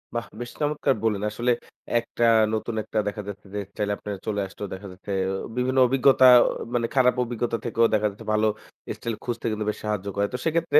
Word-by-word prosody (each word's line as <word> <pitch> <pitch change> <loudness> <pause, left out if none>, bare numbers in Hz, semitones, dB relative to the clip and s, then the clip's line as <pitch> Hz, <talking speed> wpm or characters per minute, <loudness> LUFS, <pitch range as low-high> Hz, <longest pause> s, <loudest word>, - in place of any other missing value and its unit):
বাহ! 120 - -1 0.2
বেশ 120 - -6
চমৎকার 145 -2 +1
বলেন। 105 -3 +1
আসলে 120 +4 0 0.5
একটা 120 0 -4 0.3
নতুন 110 +1 -2
একটা 110 +1 -2
দেখা 105 +1 -3
যাচ্ছে 100 0 -8
যে 105 - -1
স্টাইল 105 0 -2
আপনার 105 -1 -5
চলে 105 -1 0
আসলো 95 +2 -7
দেখা 95 +2 -8
যাচ্ছে 95 +2 -9 0.2
অ - - -2 0.2
বিভিন্ন 130 +1 0
অভিজ্ঞতা 135 +1 +5 0.2
অ - - +1 0.3
মানে 120 -1 +1
খারাপ 125 -1 +4
অভিজ্ঞতা 120 -1 -2
থেকেও 115 0 +3
দেখা 105 0 +3
যাচ্ছে 100 - -12
ভালো 110 0 +3 0.5
স্টাইল 115 -1 -4
খুঁজতে 120 -1 -4
কিন্তু 110 0 -2
বেশি 105 - -4
সাহায্য 105 -2 -2
করে। 100 0 +1
তো - - -1
সেক্ষেত্রে 160 -2 +4
115 Hz, 200 wpm, -25 LUFS, 105-125 Hz, 0.5 s, অভিজ্ঞতা